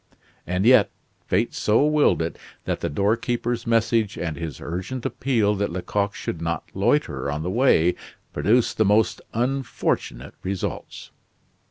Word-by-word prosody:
And 90 Hz, +3 st, 0 dB
yet, 120 Hz, -3 st, +6 dB, 0.4 s
fate 105 Hz, +6 st, +1 dB
so 110 Hz, +7 st, +2 dB
willed 150 Hz, -, +3 dB
it 80 Hz, -, -5 dB, 0.3 s
that -, -, -1 dB
the -, -, -2 dB
doorkeeper's 115 Hz, +7 st, -1 dB
message 115 Hz, -2 st, +2 dB
and 80 Hz, -3 st, -3 dB
his 80 Hz, -3 st, -6 dB
urgent 95 Hz, +9 st, -5 dB
appeal 115 Hz, -6 st, +1 dB
that 100 Hz, -2 st, -1 dB
Lecoq 100 Hz, +3 st, -2 dB
should 85 Hz, -, -5 dB
not 85 Hz, -1 st, -2 dB
loiter 95 Hz, -, 0 dB
on 75 Hz, +2 st, -3 dB
the 90 Hz, -, -2 dB
way, 95 Hz, -7 st, +4 dB, 0.4 s
produced 110 Hz, +12 st, +2 dB
the -, -, +6 dB
most 105 Hz, +2 st, +2 dB
unfortunate 125 Hz, -, -2 dB
results. 95 Hz, 0 st, -5 dB
105 Hz, 140 wpm, -24 LUFS, 85-120 Hz, 0.4 s, yet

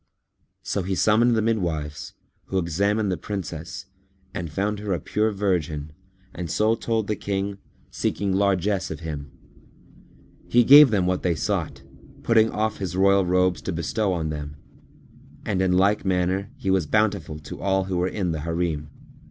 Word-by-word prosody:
So 100 Hz, -, -1 dB
he 95 Hz, +1 st, -2 dB
summoned 115 Hz, +5 st, +3 dB
the 110 Hz, -, +1 dB
midwives, 80 Hz, -10 st, -2 dB, 0.3 s
who 95 Hz, -, -3 dB
examined 100 Hz, +4 st, 0 dB
the 90 Hz, -, -1 dB
Princess 85 Hz, -1 st, -6 dB, 0.5 s
and 90 Hz, -5 st, -5 dB
found 100 Hz, +5 st, -1 dB
her 105 Hz, -2 st, -2 dB
a 85 Hz, -, -1 dB
pure 110 Hz, +8 st, 0 dB
virgin 85 Hz, -7 st, -1 dB, 0.4 s
and 85 Hz, -1 st, -5 dB
so 110 Hz, +6 st, +2 dB
told 115 Hz, -1 st, -1 dB
the 105 Hz, -, -1 dB
King, 100 Hz, 0 st, -3 dB, 0.3 s
seeking 100 Hz, -2 st, -1 dB
largesse 95 Hz, 0 st, +1 dB
of 80 Hz, +1 st, -6 dB
him. 75 Hz, -3 st, -6 dB, 1.2 s
He 120 Hz, 0 st, +5 dB
gave 145 Hz, +3 st, +9 dB
them 100 Hz, -5 st, +1 dB
what 90 Hz, 0 st, 0 dB
they 85 Hz, -2 st, +1 dB
sought, 70 Hz, -3 st, -2 dB, 0.4 s
putting 110 Hz, -1 st, +4 dB
off 110 Hz, 0 st, -2 dB
his 90 Hz, -3 st, -4 dB
royal 100 Hz, -1 st, +4 dB
robes 90 Hz, 0 st, +2 dB
to -, -, -3 dB
bestow 95 Hz, +5 st, -1 dB
on 80 Hz, -3 st, -2 dB
them, 75 Hz, -1 st, -6 dB, 0.9 s
and 95 Hz, -3 st, 0 dB
in 95 Hz, -1 st, +2 dB
like 100 Hz, +3 st, +3 dB
manner 95 Hz, +1 st, 0 dB
he 95 Hz, -8 st, -1 dB
was 95 Hz, -5 st, +1 dB
bountiful 100 Hz, -6 st, 0 dB
to 75 Hz, -, -9 dB
all 95 Hz, 0 st, +1 dB
who 95 Hz, -1 st, -3 dB
were 90 Hz, +1 st, +1 dB
in 95 Hz, -2 st, -2 dB
the 80 Hz, -, -3 dB
Harim. 80 Hz, -2 st, -2 dB
95 Hz, 165 wpm, -24 LUFS, 85-105 Hz, 1.2 s, gave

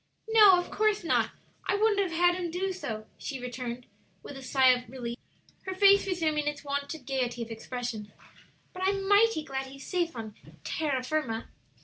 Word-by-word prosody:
"No, 425 Hz, -4 st, +8 dB
of 355 Hz, -, -6 dB
course 425 Hz, -2 st, +1 dB
not; 330 Hz, -, +2 dB, 0.4 s
I -, -, +2 dB
wouldn't 420 Hz, 0 st, +3 dB
have 380 Hz, -3 st, +1 dB
had 350 Hz, +2 st, +4 dB
him 355 Hz, -1 st, -3 dB
do 375 Hz, +3 st, -2 dB
so," 220 Hz, -12 st, -5 dB
she 270 Hz, -3 st, -5 dB
returned, 250 Hz, 0 st, -5 dB, 0.4 s
with 285 Hz, -, -9 dB
a 270 Hz, -, -8 dB
sigh 260 Hz, 0 st, +4 dB
of 250 Hz, -2 st, +2 dB
relief, 240 Hz, -2 st, -5 dB, 0.5 s
her 375 Hz, -, -3 dB
face 400 Hz, +1 st, +6 dB
resuming 310 Hz, -5 st, 0 dB
its 295 Hz, 0 st, -3 dB
wonted 280 Hz, 0 st, -4 dB
gayety 245 Hz, -3 st, -1 dB
of 230 Hz, -, -9 dB
expression; 225 Hz, -2 st, -5 dB, 0.6 s
"but 365 Hz, -, -8 dB
I'm 390 Hz, 0 st, 0 dB
mighty 410 Hz, -4 st, +4 dB
glad 270 Hz, -3 st, -4 dB
he's 275 Hz, +1 st, -11 dB
safe 345 Hz, -4 st, -1 dB
on 220 Hz, -2 st, -6 dB, 0.3 s
terra 285 Hz, -5 st, -1 dB
firma." 255 Hz, -5 st, -2 dB
295 Hz, 175 wpm, -29 LUFS, 250-370 Hz, 0.6 s, No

